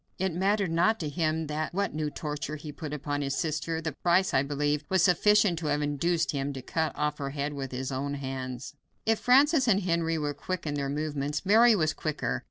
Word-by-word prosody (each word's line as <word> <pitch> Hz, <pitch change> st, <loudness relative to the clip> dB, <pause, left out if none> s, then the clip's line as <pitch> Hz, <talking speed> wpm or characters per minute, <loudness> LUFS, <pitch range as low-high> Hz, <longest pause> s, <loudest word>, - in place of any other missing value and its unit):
It 190 Hz, -1 st, -1 dB
mattered 195 Hz, +1 st, +1 dB
not 180 Hz, +7 st, +2 dB
to 155 Hz, -, -2 dB
him 160 Hz, +1 st, -1 dB, 0.3 s
what 200 Hz, +2 st, -1 dB
new 155 Hz, 0 st, -2 dB
torture 150 Hz, 0 st, -4 dB
he 150 Hz, 0 st, -8 dB
put 145 Hz, +1 st, -7 dB
upon 145 Hz, 0 st, -3 dB
his 140 Hz, -1 st, -1 dB
sister; 160 Hz, 0 st, -1 dB
the 160 Hz, -1 st, -2 dB
price, 175 Hz, +6 st, +2 dB
I 130 Hz, -, +4 dB
believe, 145 Hz, +1 st, -1 dB
was 190 Hz, -1 st, +3 dB
sufficient 205 Hz, -1 st, +4 dB
to 160 Hz, -, -4 dB
have 150 Hz, 0 st, +1 dB
induced 160 Hz, +4 st, 0 dB
him 140 Hz, 0 st, -2 dB
to 135 Hz, -, -6 dB
cut 160 Hz, +4 st, -1 dB
off 150 Hz, 0 st, -1 dB
her 140 Hz, -1 st, -3 dB
head 145 Hz, +1 st, -3 dB
with 135 Hz, -2 st, -5 dB
his 130 Hz, +1 st, -4 dB
own 140 Hz, +2 st, -2 dB
hands. 130 Hz, -1 st, -5 dB, 0.3 s
If 225 Hz, -1 st, +2 dB
Francis 270 Hz, +2 st, +4 dB
and 200 Hz, -3 st, +4 dB
Henry 170 Hz, -2 st, 0 dB
were 150 Hz, -1 st, -2 dB
quick 175 Hz, +5 st, -5 dB
in 150 Hz, -, -2 dB
their 140 Hz, -1 st, -2 dB
movements, 145 Hz, +1 st, -2 dB
Mary 225 Hz, +3 st, +6 dB
was 155 Hz, -5 st, +1 dB
quicker. 155 Hz, -2 st, -2 dB
155 Hz, 210 wpm, -28 LUFS, 145-175 Hz, 0.3 s, Mary